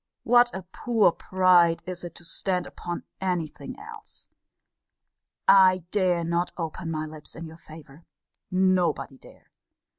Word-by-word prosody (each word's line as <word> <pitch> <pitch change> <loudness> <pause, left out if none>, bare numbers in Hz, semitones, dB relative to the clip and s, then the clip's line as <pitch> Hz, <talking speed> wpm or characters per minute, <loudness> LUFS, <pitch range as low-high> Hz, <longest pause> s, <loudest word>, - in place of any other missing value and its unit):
What 240 0 +5
a 190 - -6
poor 215 +2 +2
pride 180 -2 +3
is 180 -1 -6
it 175 -1 -8
to 175 - -13
stand 180 +1 -1
upon 175 0 -6 0.2
any 180 -3 0
thing 145 -1 -10
else! 440 0 -11 1.2
I 185 -2 +6
dare 180 -4 +1
not 170 +1 -1
open 165 0 -4
my 155 -1 -2
lips 155 -1 -8
in 165 - -7
your 160 0 -11
favour. 155 -1 -14 0.4
Nobody 185 -7 +1
dare. - - -18
175 Hz, 140 wpm, -26 LUFS, 165-185 Hz, 1.2 s, I